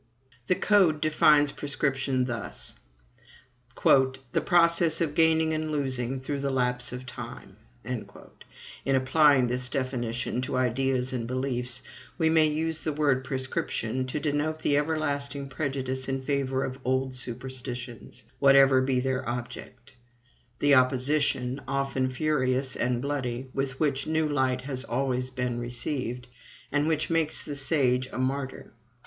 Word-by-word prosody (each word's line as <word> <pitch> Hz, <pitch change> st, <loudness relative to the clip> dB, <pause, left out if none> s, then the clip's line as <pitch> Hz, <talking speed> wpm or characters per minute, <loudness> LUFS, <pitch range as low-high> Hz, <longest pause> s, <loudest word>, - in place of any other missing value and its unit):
The 185 Hz, -, +3 dB
Code 185 Hz, -8 st, +3 dB
defines 150 Hz, -1 st, +4 dB
prescription 135 Hz, -3 st, -1 dB
thus: 120 Hz, -4 st, -3 dB, 1.1 s
"The 130 Hz, -1 st, +3 dB
process 170 Hz, -1 st, +4 dB
of 160 Hz, -3 st, 0 dB
gaining 160 Hz, 0 st, +3 dB
and 155 Hz, 0 st, -2 dB
losing 130 Hz, -3 st, -1 dB
through 140 Hz, +2 st, -3 dB
the 140 Hz, 0 st, -1 dB
lapse 125 Hz, -2 st, 0 dB
of 125 Hz, +1 st, -7 dB
time." 125 Hz, -, -9 dB, 0.3 s
In 135 Hz, +1 st, -6 dB
applying 135 Hz, 0 st, +4 dB
this 125 Hz, +1 st, 0 dB
definition 125 Hz, -2 st, -2 dB
to 130 Hz, -, -2 dB
ideas 130 Hz, +1 st, 0 dB
and 115 Hz, -2 st, -3 dB
beliefs, 125 Hz, -1 st, -3 dB, 0.3 s
we 160 Hz, -2 st, +2 dB
may 160 Hz, -1 st, +5 dB
use 160 Hz, +1 st, -1 dB
the 155 Hz, -, 0 dB
word 145 Hz, -3 st, +1 dB
PRESCRIPTION 130 Hz, -2 st, -2 dB
to 140 Hz, +4 st, -3 dB
denote 155 Hz, +1 st, -1 dB
the 145 Hz, -, +2 dB
everlasting 145 Hz, -2 st, -1 dB
prejudice 135 Hz, -2 st, -3 dB
in 135 Hz, 0 st, -2 dB
favor 135 Hz, -1 st, -1 dB
of 130 Hz, 0 st, -5 dB
old 130 Hz, 0 st, 0 dB
superstitions, 125 Hz, -2 st, -4 dB, 0.2 s
whatever 135 Hz, -1 st, +6 dB
be 130 Hz, -1 st, +1 dB
their 130 Hz, -1 st, -2 dB
object; 120 Hz, 0 st, -7 dB, 0.6 s
the 145 Hz, 0 st, +3 dB
opposition, 130 Hz, 0 st, +2 dB
often 135 Hz, -1 st, -1 dB
furious 130 Hz, -2 st, 0 dB
and 125 Hz, 0 st, -1 dB
bloody, 130 Hz, -3 st, -3 dB
with 135 Hz, 0 st, -3 dB
which 140 Hz, -3 st, 0 dB
new 160 Hz, 0 st, +1 dB
light 130 Hz, -3 st, 0 dB
has 130 Hz, -1 st, -4 dB
always 130 Hz, 0 st, -1 dB
been 125 Hz, -2 st, -3 dB
received, 125 Hz, +1 st, -3 dB, 0.4 s
and 145 Hz, +1 st, +1 dB
which 155 Hz, 0 st, 0 dB
makes 165 Hz, -2 st, +1 dB
the 145 Hz, -, -5 dB
sage 135 Hz, -3 st, +2 dB
a -, -, -6 dB
martyr. 130 Hz, +1 st, -3 dB
135 Hz, 135 wpm, -27 LUFS, 125-145 Hz, 1.1 s, whatever